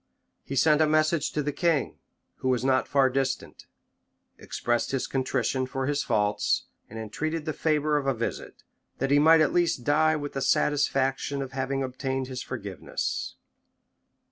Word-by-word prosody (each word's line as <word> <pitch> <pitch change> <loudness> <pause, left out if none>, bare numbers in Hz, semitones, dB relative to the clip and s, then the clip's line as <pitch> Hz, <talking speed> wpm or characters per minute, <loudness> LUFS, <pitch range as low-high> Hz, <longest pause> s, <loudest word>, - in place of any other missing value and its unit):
He 135 - -6
sent 150 +3 +4
a 155 - +4
message 155 0 +2
to 150 - -1
the 145 - -1
king, 155 -1 0 0.4
who 130 - -2
was 125 0 +1
not 130 -1 +2
far 140 -2 +3
distant; 130 0 -3 0.7
expressed 120 0 -1
his 135 -2 -1
contrition 130 -1 -1
for 135 0 -3
his 145 +1 0
faults; 105 0 +1 0.3
and 110 - -9
entreated 150 +9 -3
the 155 - -2
favor 150 -1 +1
of 140 -2 -2
a 135 - +2
visit, 115 0 -5 0.3
that 135 +1 -1
he 145 - +6
might 160 +2 +6
at 155 - +2
least 170 -8 +1
die 155 +3 +3
with 145 -1 -5
the 135 - -3
satisfaction 135 0 +1
of 135 - -8
having 135 +1 -2
obtained 130 0 -3
his 130 -1 -5
forgiveness. 100 - -4
135 Hz, 165 wpm, -27 LUFS, 130-150 Hz, 0.7 s, he